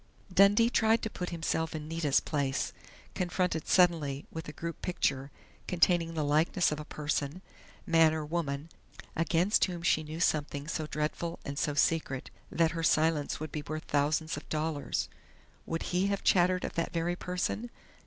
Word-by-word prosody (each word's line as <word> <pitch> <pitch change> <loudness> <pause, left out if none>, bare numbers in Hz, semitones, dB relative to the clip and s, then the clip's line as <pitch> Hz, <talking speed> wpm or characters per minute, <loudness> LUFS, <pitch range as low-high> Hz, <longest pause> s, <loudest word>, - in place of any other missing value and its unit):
Dundee 205 +5 +6
tried 225 0 +3
to 220 - -2
put 180 - -4
himself 160 -1 -2
in 150 -1 -5
Nita's 160 -3 +2
place, 140 -3 -1 0.4
confronted 180 -2 -1
suddenly 160 -6 +3
with 160 -1 -6
a - - -5
group 165 +2 -6
picture 140 -6 -1 0.4
containing 170 -1 +2
the 155 - 0
likeness 155 +5 +2
of 150 - -3
a - - -5
person 150 +3 -3 0.4
man 165 -1 +5
or 155 -1 -2
woman 150 -2 -3 0.5
against 165 +5 +3
whom 175 -2 -6
she 155 - +3
knew 155 +1 -7
something 145 -3 0
so 155 -1 -3
dreadful 155 +3 -2
and 140 0 -4
so 145 0 0
secret 145 -3 0 0.2
that 165 -1 +2
her 165 - -3
silence 155 -2 +2
would 155 -1 -5
be 150 - -3
worth 155 +1 -4
thousands 150 +2 0
of - - -9
dollars. 155 -1 -1 0.6
Would 165 0 -2
he 185 +2 +2
have 200 -1 -1
chattered 180 0 +3
of - - -3
that 165 - -1
very 170 +1 0
person? 180 +6 -3
160 Hz, 165 wpm, -30 LUFS, 150-175 Hz, 0.6 s, Dundee